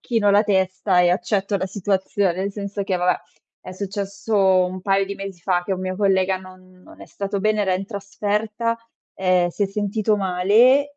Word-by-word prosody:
chino 225 -4 +1
la 205 +1 +5
testa 190 -2 +1
e 175 - +4
accetto 200 +1 0
la 190 0 -2
situazione, 190 -1 -1
nel 195 +2 -2
senso 200 0 -4
che 195 -1 -1
vabbè, 180 0 +2 0.5
è - - -10
successo 200 +2 -4 0.3
un 185 +1 -5
paio 195 +1 +2
di 200 - -5
mesi 195 -3 -8
fa 180 0 0
che 195 - -2
un 185 - -3
mio 185 0 -3
collega 190 -1 +2
non 185 0 -16
non - - -16
è - - -10
stato 200 0 -4
bene 215 +1 +1
era 190 -2 +1
in 195 +1 -3
trasferta, 210 +2 -2 0.4
ehm, 185 -2 +2
si 205 - -3
è - - +3
sentito 210 +2 0
male 220 +10 +3
195 Hz, 190 wpm, -22 LUFS, 185-205 Hz, 0.5 s, la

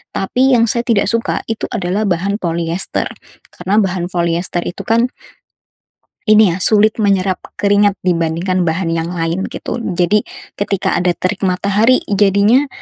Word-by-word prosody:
tapi, 255 +7 +1
yang 230 -1 +4
saya 235 +1 0
tidak 215 -5 +2
suka 230 0 -1
itu 225 - -2
adalah 195 0 -1
bahan 195 +3 -1
poliester, 170 +1 -2 0.4
karena 185 +3 -2
bahan 185 -3 -1
poliester 170 0 -1
itu, 175 - -5
kan, 230 +2 +2 1.2
ini, 215 -4 +6
ya, - - -4
sulit 215 +1 +4
menyerap 195 -2 +1 0.2
keringat 205 -1 +3
dibandingkan 175 +1 0
bahan 165 +1 -1
yang 165 0 -2
lain, 170 +2 -2
gitu. - - -5
Jadi, 185 +1 +1 0.4
ketika 200 -1 -1
ada 180 0 +1
terik 185 +2 -2
matahari, 200 +6 +2
jadinya 205 +7 +3
195 Hz, 140 wpm, -16 LUFS, 175-210 Hz, 1.2 s, ini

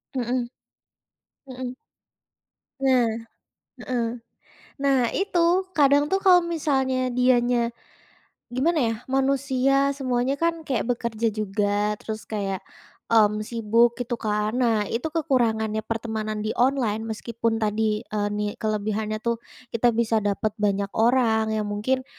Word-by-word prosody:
Hmm 245 0 -1 1.0
hmm. 255 -1 -6 1.1
Nah, 260 -3 +4 0.8
heeh. 240 -2 -1 0.8
Nah 275 -1 +4 0.2
itu, 390 -3 0 0.4
kadang 285 0 +5
tuh 385 - +3
kalau 365 -2 +6
misalnya 270 -6 0
dianya 245 -1 +2 0.8
gimana 310 +7 +1
ya, - - -3
manusia 275 0 +2
semuanya 255 0 0
kan 335 +2 0
kayak 255 -6 0
bekerja 235 -1 -1
juga, 205 0 0
terus 220 0 -6
kayak, 195 -3 -2 0.5
mmm, 215 -2 +4
sibuk 230 +1 +2
gitu 245 0 -2
kan. 210 0 0
Nah, 220 -3 +2
itu 240 +10 -2
kekurangannya 230 -9 +1
pertemanan 220 -1 -3
di 215 - -1
online 240 -4 +1
meskipun 225 +1 -2
tadi, 215 0 0
eee, 205 -1 -1
ni 210 - -1 0.2
kelebihannya 215 0 -1
tuh 235 -1 0 0.3
kita 230 +1 +3
bisa 225 -1 +2
dapat 205 +1 0
banyak 200 -1 0
orang 225 -2 +3
yang 215 - -1
mungkin 220 +6 -1
235 Hz, 120 wpm, -24 LUFS, 215-260 Hz, 1.1 s, kalau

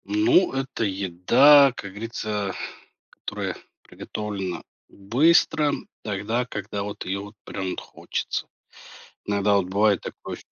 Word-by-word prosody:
Ну, 330 - +3
это 135 -3 -2
еда, 110 +9 +5
как 100 - -7
говорится, 105 -2 -3 0.6
которая - - -5 0.3
приготовлена 100 -4 -5 0.3
быстро, 150 - +3 0.3
тогда, 110 +4 -1
когда 105 -3 -5
вот 105 0 -6
ее 95 +2 -2
вот 105 +2 -10
прям 95 -1 -4
вот - - -4
хочется, - - -4 0.8
иногда 100 0 +2
вот 100 -2 +1
бывает 100 +1 +2
такое - - -7
105 Hz, 115 wpm, -24 LUFS, 100-125 Hz, 0.8 s, еда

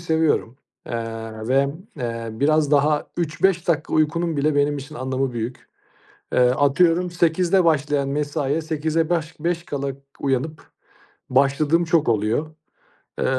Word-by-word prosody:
seviyorum, 160 -7 0 0.3
eee, 115 -1 -5
ve, 135 +2 +3 0.3
eee, 115 -3 -4
biraz 150 +4 +2
daha 150 +1 +3
3-5 170 +2 0
dakika 160 -2 0
uykunun 165 +1 +1
bile 145 +1 +1
benim 145 0 +2
için 145 +3 -9
anlamı 130 -1 -2
büyük. 120 +1 -5 0.6
Eee, - - +2
atıyorum 160 +8 +3
08:00'da 175 +2 +2
başlayan 145 -3 +1
mesaiye 145 +1 -1
sekize 160 +1 -1
baş 160 -2 -1
beş 170 +1 -1
kala 140 -3 -3 0.3
uyanıp 140 +3 -2 0.6
başladığım 140 +5 +3
çok 160 -6 +2
oluyor. 115 +9 0 0.6
Eee - - 0
150 Hz, 125 wpm, -22 LUFS, 135-160 Hz, 0.6 s, ve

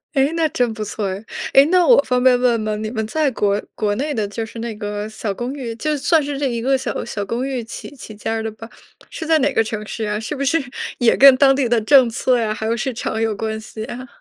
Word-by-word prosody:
诶， 275 +2 +3
那 325 -1 +2
真 245 -7 0
不 215 -1 -5
错 210 0 -3
哎。 190 +2 -5 0.3
诶， 275 - +8
那 355 +2 +3
我 485 - +6
方 250 -2 0
便 255 -1 +5
问 245 -2 +2
吗？ 215 0 -2
你 215 +1 -4
们 220 -1 -3
在 300 +6 0
国 205 -4 0
国 210 -1 0
内 285 +7 -2
的 215 -5 -1
就 215 +3 -4
是 225 +1 -9
那 230 -1 -4
个 210 0 -4
小 220 -1 -4
公 240 +6 -4
寓， 245 -5 -5
就 305 +6 -1
算 315 +2 +2
是 285 0 -4
这 285 - 0
一 235 -2 -2
个 270 +3 +2
小 265 - -3
小 210 -3 -4
公 235 +6 -3
寓 260 -3 -3
起 230 +5 -9
起 220 -5 -11
家 220 +2 -3
儿 225 - -2
的 220 - -3
吧， 225 +1 -11 0.4
是 320 - -6
在 320 0 +4
哪 280 0 +1
个 225 - +3
城 215 -1 -5
市 220 +1 -4
啊？ 210 0 -2
是 225 +7 -5
不 275 - -3
是 280 +4 +2 0.4
也 240 -2 +3
跟 275 -1 +8
当 270 0 +5
地 265 -3 0
的 240 -1 +3
政 255 +2 +5
策 250 +1 +1
呀， 220 -2 -1
还 220 +1 -5
有 225 +1 +1
市 260 +3 -2
场 225 -1 -3
有 225 -1 0
关 220 +1 -3
系 220 0 -8
呀？ 250 +3 -7
235 Hz, 290 characters per minute, -20 LUFS, 220-270 Hz, 0.4 s, 诶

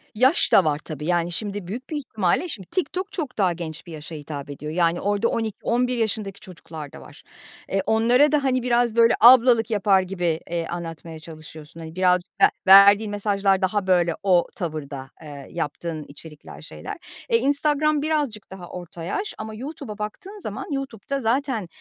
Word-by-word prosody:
Yaş 260 +9 +3
da 190 - +6
var 150 -1 +1
tabii, 150 -2 -7
yani, 175 0 0
şimdi 205 0 -4
büyük 235 +7 -7
bir 310 - -3
ihtimalle 220 - -1
şimdi 195 - -7
TikTok 370 +3 -2
çok 295 -8 -5
daha 185 -4 +2
genç 165 -1 -7
bir 170 - -11
yaşa 155 +1 -8
hitap 145 -1 -7
ediyor. 150 +2 -6
Yani 170 +1 +1
orada 205 +2 +1
12-11 235 +3 -1
yaşındaki 215 -3 -2
çocuklar 160 -5 -10
da - - -12
var. - - -15 0.5
Eee, 195 - 0
onlara 245 +6 +4
da, 300 -2 +2
hani, 255 -2 +1
biraz 240 -2 +1
böyle 230 -1 +5
ablalık 240 -1 +7
yapar 200 -2 +3
gibi, 175 -3 -2
eee, 170 -1 -2
anlatmaya 165 -1 -7
çalışıyorsun. 155 0 -12
Hani, 160 0 -9
biraz 180 -1 +3 0.2
ve - - +10 0.2
verdiğin 200 +2 +8
mesajlar 200 -2 +1
daha 195 +1 0
böyle 175 -2 +3
o 180 -3 +3
tavırda, 145 -6 -5
ııı, 145 -3 -10
yaptığın 165 0 -4
içerikler, 150 +1 -12
şeyler. - - -8 0.3
E, 460 - +4
Instagram 295 -2 +1
birazcık 290 -11 -2
daha 180 -2 -9
orta 175 -2 -9
yaş, 395 - -3
ama 220 0 -6
YouTube'a 255 -2 -7
baktığın 365 - -7
zaman, 370 - -6
YouTube'da 275 -1 -4
zaten, 235 -3 0
200 Hz, 170 wpm, -23 LUFS, 170-245 Hz, 0.5 s, ve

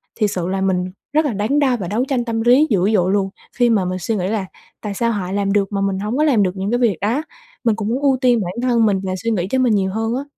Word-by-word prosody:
thiệt 210 -3 0
sự 175 -2 -2
là 190 +1 -2
mình 185 -1 0 0.2
rất 310 +1 +3
là 275 - -1
đắn 215 +8 0
đo 260 -4 +2
và 190 -6 -5
đấu 215 +6 0
tranh 255 -3 -1
tâm 225 -1 -2
lý 250 +6 +5
dữ 195 -3 +2
dội 185 -2 +2
luôn, 195 -1 +1 0.3
khi 245 -1 +3
mà 210 -5 +2
mình 185 +1 -3
suy 220 +6 -2
nghĩ 185 -3 -1
là 205 -1 -1 0.4
"Tại 210 -2 -4
sao 230 +3 0
họ 190 -4 -3
làm 200 0 0
được 200 -1 +1
mà 200 -1 -1
mình 195 -1 -1
hổng 210 +5 -2
có 300 - +3
làm 250 -10 +3
được 185 - +1
những 195 +2 -2
cái 240 - +2
việc 225 -8 +2
đó?" 235 +9 0 0.4
mình 230 -3 +2
cũng 215 -1 -4
muốn 250 +4 -1
ưu 275 -2 +3
tiên 245 -3 +4
bản 175 - -4
thân 240 -3 +2
mình 200 -3 +2
và 185 -1 -2
suy 230 - 0
nghĩ 185 -4 -1
cho 260 - +1
mình 245 -4 +3
nhiều 190 -1 0
hơn 225 +3 -1
á. 270 - -3
210 Hz, 305 wpm, -19 LUFS, 195-240 Hz, 0.4 s, lý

